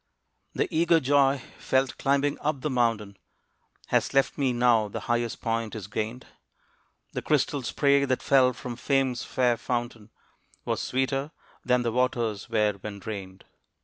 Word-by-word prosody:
The - - +1
eager 165 +1 +4
joy 140 -1 +3 0.2
felt 130 0 0
climbing 140 +1 +1
up 150 -2 -2
the 150 - -2
mountain 115 -5 0 0.7
Has - - +1
left 135 - +3
me 135 -3 +1
now 120 -3 +3
the 100 - -6
highest 120 -1 -1
point 115 -1 -2
is 105 -4 -6
gained. 110 +4 -4 0.9
The - - -3
crystal 145 -1 +1
spray 140 +2 +2
that 130 -2 -1
fell 130 -2 +5
from 120 -2 -7
Fame's 135 -3 0
fair 125 -2 +1
fountain 120 -3 -4 0.6
Was - - -1
sweeter 135 +2 -1 0.3
than 125 -1 +2
the 120 - 0
waters 115 -4 -1
were 105 -1 +2
when 105 -1 -6
drained. 95 -2 -8
125 Hz, 145 wpm, -27 LUFS, 115-135 Hz, 0.9 s, fell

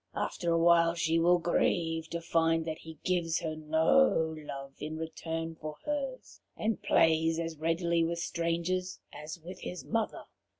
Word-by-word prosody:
After 170 -2 -1
a 165 - +3
while 170 0 +5
she 165 -1 +1
will 175 +2 +5
grieve 165 -1 0
to 170 - -3
find 165 -1 +2
that 160 -1 -4
he 160 -1 -11
gives 170 -3 +1
her 155 -1 -3
no 160 +3 +3
love 140 -3 -8
in 155 +1 -5
return 165 0 -4
for 155 -1 -7
hers, 275 -3 -4 0.2
and 220 0 -1
plays 160 0 +3
as 165 -2 -4
readily 165 +1 +1
with 170 +1 -1
strangers 170 +2 -1
as 155 +3 -7
with 185 +1 -8
his 180 - -6
mother. 225 -1 -1
165 Hz, 160 wpm, -31 LUFS, 160-175 Hz, 0.2 s, while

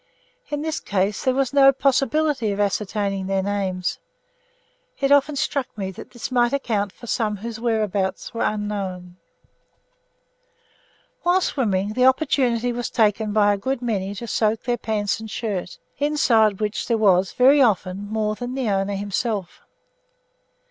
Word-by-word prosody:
In 295 0 -3
this 315 0 -2
case 200 +1 -1
there 260 -1 +2
was 270 -1 0
no 275 -1 +7
possibility 275 -2 +1
of 200 - -4
ascertaining 200 -1 -1
their 195 0 0
names. 190 -2 -2 1.0
It 275 0 +1
often 285 +1 +4
struck 275 -1 -1
me 190 -2 -3
that 185 - -11
this 240 +1 -7
might 240 0 +2
account 215 -8 -1
for 240 - -13
some 215 -3 -1
whose 225 +2 -6
whereabouts 210 -5 -1
were 230 - -4
unknown. 195 -4 -3 2.0
While 355 +2 +3
swimming, 205 - 0
the 250 +2 +3
opportunity 255 -3 +2
was 240 0 -3
taken 215 -1 +1
by 205 -1 +4
a - - -2
good 260 +4 -2
many 200 -4 -2
to 235 - -6
soak 220 -1 0
their 245 0 0
pants 210 -1 -1
and 220 0 -8
shirts, 200 -5 -4 0.2
inside 230 -9 +3
which 210 0 -2
there 230 - +2
was, 190 -3 +3
very 275 +3 +5
often, 200 -4 +1
more 215 -1 0
than 245 +3 -5
the 255 -6 -1
owner 195 +1 0
himself. 205 -1 -3
220 Hz, 150 wpm, -22 LUFS, 200-255 Hz, 2.0 s, no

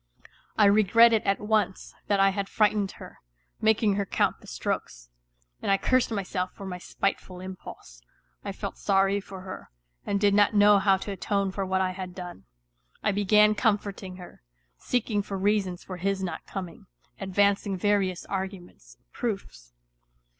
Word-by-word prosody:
I 210 - +6
regretted 215 +2 +5
at 195 - +1
once 210 -3 -1
that 200 -1 +2
I 195 0 +6
had 195 0 -3
frightened 210 -2 +1
her, - - -12 0.4
making 215 -2 +3
her 200 - 0
count - - 0
the - - -15
strokes, - - -4 0.5
and - - -3
I 195 - +4
cursed 255 +4 +2
myself 190 -3 -2
for 200 - -9
my 180 -1 -5
spiteful 185 0 -3
impulse; 185 - -10 0.4
I - - -4
felt - - -6
sorry 195 0 +2
for 190 -1 -10
her, 185 0 -9 0.3
and 200 - -1
did 205 -1 +3
not 205 +1 +4
know 205 0 +6
how 195 0 +4
to 200 - -6
atone 195 0 -1
for 195 0 -3
what 190 0 +1
I 185 -1 +1
had 185 -1 -7
done. 175 - -8 0.6
I - - +2
began 210 +1 +4
comforting 205 -3 -1
her, 180 - -12 0.3
seeking 215 - -1
for 200 -1 -5
reasons 195 -2 0
for 185 - -7
his 195 +2 -1
not 175 -4 -5
coming, 185 -4 -7 0.3
advancing 200 +1 +1
various 195 -2 0
arguments, 190 -2 -6 0.2
proofs. 195 - -5
195 Hz, 160 wpm, -27 LUFS, 185-205 Hz, 0.6 s, I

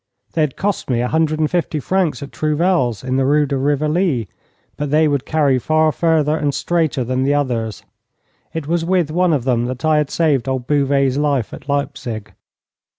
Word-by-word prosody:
They 165 - 0
had 150 -4 0
cost 200 -5 -2
me 120 -2 +1
a 125 - 0
hundred 155 +1 +1
and 155 -1 +1
fifty 170 -3 -1
francs 165 -4 0
at 140 - -9
Trouvel's, 155 - 0
in 130 0 -1
the 135 - +2
Rue 145 +2 +3
de 140 - -2
Rivoli, 145 - 0 0.5
but 145 -1 -3
they 155 +2 +3
would 140 -3 -1
carry 145 -5 +2
far 155 +4 +2
further 155 -2 +1
and 145 -3 -1
straighter 160 -6 0
than 130 +2 -1
the 140 +2 +2
others. 115 -7 -2 0.7
It 160 -3 -4
was 170 +1 0
with 175 -3 +1
one 180 +2 +2
of 145 -6 +1
them 120 -2 +1
that 130 +3 -4
I 155 -1 +3
had 150 -2 -1
saved 145 -7 +1
old 130 -2 -2
Bouvet's 140 -1 +1
life 140 -6 0
at - - -10
Leipzig. 140 -6 -3
145 Hz, 195 wpm, -19 LUFS, 130-155 Hz, 0.7 s, Rue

